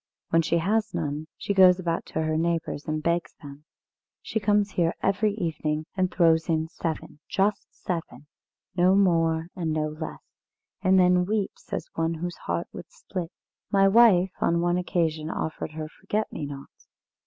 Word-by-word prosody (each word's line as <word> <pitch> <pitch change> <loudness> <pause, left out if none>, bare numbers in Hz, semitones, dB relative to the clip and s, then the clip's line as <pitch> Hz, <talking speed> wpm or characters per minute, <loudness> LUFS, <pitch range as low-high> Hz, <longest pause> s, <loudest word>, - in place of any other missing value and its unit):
When 165 - +5
she 165 +1 +1
has 210 +6 0
none, 150 +1 -3
she 200 - -2
goes 185 -2 +7
about 170 -3 -2
to 160 - -2
her 155 0 0
neighbours 165 -2 -1
and 155 0 -2
begs 170 +1 -1
them. 145 0 -12 0.6
She 220 - -2
comes 205 -1 +2
here 170 -1 +1
every 205 +1 +1
evening 155 -5 -2
and 185 -1 +1
throws 165 -2 +3
in 160 0 0
seven 160 -3 -5
just 200 +1 0
seven, 165 -4 -5 0.5
no 180 +1 +4
more 165 -4 +2
and 165 -3 -2
no 155 0 0
less 155 +1 -7 0.6
and 190 0 +4
then 180 0 +4
weeps 210 -1 -3
as - - -2
one 165 0 -1
whose 175 +2 -5
heart - - -1
would - - -9
split. 190 - -6 0.4
My 195 -1 +4
wife 195 -4 +6
on 170 0 +2
one 175 +1 +1
occasion 160 -4 -1
offered 160 -1 -4
her 155 0 -5
forget 205 +6 -3
me 150 - -4
nots. 140 -1 -11
170 Hz, 165 wpm, -26 LUFS, 160-190 Hz, 0.6 s, goes